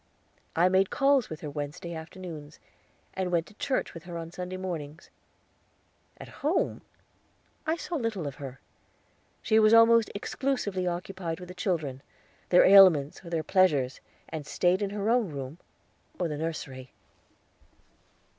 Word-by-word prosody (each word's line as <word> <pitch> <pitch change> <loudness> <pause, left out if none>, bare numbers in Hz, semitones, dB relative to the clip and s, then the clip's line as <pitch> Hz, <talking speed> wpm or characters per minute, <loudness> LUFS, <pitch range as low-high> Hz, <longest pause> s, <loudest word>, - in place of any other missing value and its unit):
I 175 +2 +4
made 190 +1 +3
calls 275 -3 +3
with 155 +2 -7
her 150 - -5
Wednesday 150 +4 -5
afternoons, 160 -2 -8 0.6
and 185 -1 -2
went 170 -2 +1
to - - -16
church 260 +5 -2
with 165 -1 -10
her 170 -2 -6
Sunday 180 +1 -5
mornings. 165 -4 -6 1.1
At - - -10
home 305 +6 0 0.9
I 320 - +2
saw 340 0 -4
little 225 - -2
of 140 - -4
her. 135 -2 -8 0.8
She 220 - +4
was 215 +1 +6
almost 230 0 +6
exclusively 205 -5 -2
occupied 175 -1 -4
with 180 0 -10
the - - -7
children 160 -8 -2 0.5
their 180 - +6
ailments 185 -8 +6
or 170 - -9
their 165 -2 -1
pleasures 150 -8 +2 0.3
and 155 -2 -6
staid 180 +2 +2
in 200 - 0
her 205 +1 -3
own 235 -4 +2
room, 140 +2 -7 0.6
or 175 - +1
the 150 - -4
nursery. 135 -5 -5
180 Hz, 145 wpm, -28 LUFS, 155-200 Hz, 1.1 s, was